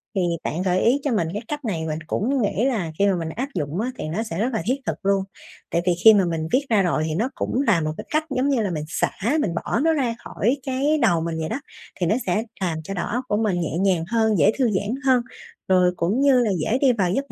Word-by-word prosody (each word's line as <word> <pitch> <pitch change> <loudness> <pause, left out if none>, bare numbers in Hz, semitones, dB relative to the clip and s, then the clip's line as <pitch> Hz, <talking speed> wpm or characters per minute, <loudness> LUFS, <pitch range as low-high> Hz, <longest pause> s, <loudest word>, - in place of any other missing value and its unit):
Thì 190 - +1 0.2
bạn 170 +4 -2
gợi 185 -1 +1
ý 255 +5 +3
cho 285 - 0
mình 175 -7 +1
cái 210 - -3
cách 295 -2 -5
này 170 -7 -2
mình 155 0 -3
cũng 260 - 0
nghĩ 205 +2 0
là 210 -12 -1
khi 200 - +4
mà 195 - +2
mình 165 -2 -3
áp 255 - -4
dụng 150 +2 -2
á, 250 - -2
thì - - -5
nó 200 +8 -2
sẽ 165 -5 -5
rất 240 +4 0
là 220 - 0
thiết 255 - +2
thực - - -1
luôn. 195 -1 +2 0.5
Tại 170 - +1
vì 180 - +3
khi 220 - +11
mà 200 -3 +3
mình 165 -2 -2
viết 275 +2 +2
ra 215 -4 +4
rồi, 170 -4 +1
thì 155 - -2
nó 225 +9 0
cũng 260 - -1
là 205 - +3
một 155 0 -2
cái - - -7
cách 310 +1 0
giống 270 +1 0
như 255 -5 +2
là 200 - -1
mình 155 -3 -3
xả, - - -1 0.3
mình 175 - -1
bỏ 230 - -1
nó 320 +3 +3
ra 250 -6 0
khỏi 240 +7 -1
cái 275 +4 +1
đầu 175 -8 +3
mình 165 0 -3
vậy 160 - -3
đó, 240 - -2 0.4
thì 175 - +1
nó 205 - +2
sẽ 200 +5 +1 0.2
làm 170 -4 -1
cho 195 - -5
đầu 180 - -2
óc 245 +4 -2
của 205 - 0
mình 200 -6 0
nhẹ 160 0 -2
nhàng 185 -3 +2
hơn, 220 -3 +2
dễ 155 - +5
thư 260 - +3
giãn 205 +4 -1
hơn, 255 -2 +4 0.5
rồi 180 -1 +4
cũng 190 +9 0
như 275 -3 +5
là 230 -4 +2
dễ 215 +10 +1
đi 260 -3 +5
vào 185 -5 0
giấc 275 +7 -2
205 Hz, 280 wpm, -23 LUFS, 175-250 Hz, 0.5 s, khi